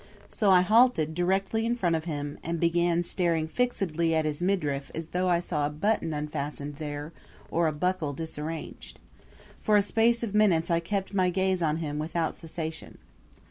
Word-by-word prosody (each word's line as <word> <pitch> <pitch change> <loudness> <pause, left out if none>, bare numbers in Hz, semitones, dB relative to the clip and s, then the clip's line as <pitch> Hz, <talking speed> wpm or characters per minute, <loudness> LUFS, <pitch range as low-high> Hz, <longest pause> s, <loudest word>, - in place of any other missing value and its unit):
So 210 -4 +1
I 185 -1 +7
halted 215 -6 +4
directly 190 +5 0
in 235 +1 +1
front 175 -8 +1
of 160 0 -3
him 145 -3 -4
and 170 +1 -2
began 170 +1 +2
staring 170 -3 +1
fixedly 170 -6 0
at 160 -1 +1
his 150 +1 -2
midriff 150 -7 0
as 165 0 -5
though 180 +1 0
I 175 -1 +3
saw 150 -4 -1
a - - -3
button 165 +2 0
unfastened 150 -1 -4
there 150 +1 -5 0.4
or 170 0 +2
a - - +1
buckle 160 0 -1
disarranged. 155 - -6 0.6
For 210 -1 +4
a 205 - +4
space 230 +3 +2
of 215 -4 -3
minutes 185 -6 +3
I 170 - +3
kept 195 +4 -3
my 185 -2 +2
gaze 190 0 0
on 155 -1 +1
him 150 -2 -3
without 160 +1 -1
cessation. 160 -1 -7
170 Hz, 180 wpm, -28 LUFS, 155-190 Hz, 0.6 s, I